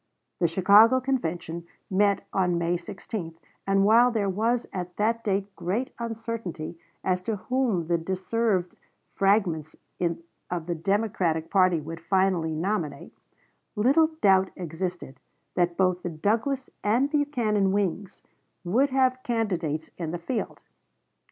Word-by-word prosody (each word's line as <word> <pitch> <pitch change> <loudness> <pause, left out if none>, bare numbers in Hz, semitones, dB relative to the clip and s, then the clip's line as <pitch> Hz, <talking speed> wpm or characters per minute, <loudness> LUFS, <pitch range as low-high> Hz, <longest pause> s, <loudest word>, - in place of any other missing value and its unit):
The 170 - +3
Chicago 200 +8 +6
Convention 170 -10 -2 0.2
met 200 0 +2
on 180 -3 +2
May 170 +1 +1
16; 175 -1 -6 0.3
and 195 0 +3
while 235 +4 +6
there 210 -5 0
was 230 +5 0
at 180 -1 -5
that 230 +2 +1
date 195 -1 -1
great 215 +9 -2
uncertainty 225 -8 -5 0.3
as 185 -1 +1
to 220 +4 -2
whom 230 -5 0
the 170 +1 +1
dissevered 190 +1 -1 0.4
fragments 190 -6 +1 0.7
of 175 -2 -3
the 175 - -1
Democratic 185 -3 0
party 185 -4 +4
would 165 +2 -7
finally 180 -3 +1
nominate, 165 -5 -3 0.6
little 270 +9 +4
doubt 190 -1 +5
existed 175 -4 -5 0.3
that 175 -1 +1
both 185 -1 +2
the 175 - -3
Douglas 225 - -1
and 245 +7 +2
Buchanan 235 -10 +1
wings 195 -1 -2 0.4
would 240 +11 +2
have 255 -1 +2
candidates 180 -11 -2
in 165 -3 -3
the 175 - -3
field. 200 +9 -4
195 Hz, 125 wpm, -26 LUFS, 175-225 Hz, 0.7 s, Chicago